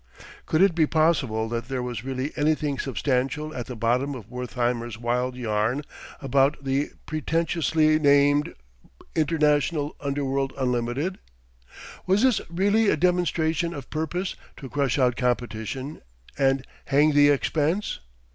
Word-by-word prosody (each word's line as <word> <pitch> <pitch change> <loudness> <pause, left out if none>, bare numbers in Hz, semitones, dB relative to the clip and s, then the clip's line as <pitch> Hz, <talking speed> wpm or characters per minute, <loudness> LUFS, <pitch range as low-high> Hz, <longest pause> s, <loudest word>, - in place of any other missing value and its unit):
Could 160 +4 +3
it 195 -3 +4
be 160 -2 +2
possible 145 -9 +1
that 115 0 -3
there 130 -1 -3
was 120 -2 -5
really 135 +2 -3
anything 150 -2 0
substantial 135 +3 -1
at 125 -5 -5
the 125 - -6
bottom 125 +5 0
of 115 -3 -10
Wertheimer's 120 -2 -2
wild 125 +2 -1
yarn 115 +3 -1 0.4
about 135 +2 +2
the 135 +2 -1
pretentiously 155 -1 +1
named 145 0 +3 0.6
"International 150 -1 +1
Underworld 140 -1 -1
Unlimited"? 130 +7 -1 0.9
Was 195 +5 +3
this 255 -4 +3
really 200 +5 +2
a - - +2
demonstration 170 -1 +1
of 140 -3 -9
purpose 170 +4 -2 0.2
to 135 - -8
crush 140 -2 0
out 125 -3 +3
competition 125 +2 -2 0.3
"and 135 -1 +1 0.2
hang 145 +2 +4
the 145 0 +5
expense"? 155 - 0
140 Hz, 130 wpm, -25 LUFS, 125-155 Hz, 0.9 s, the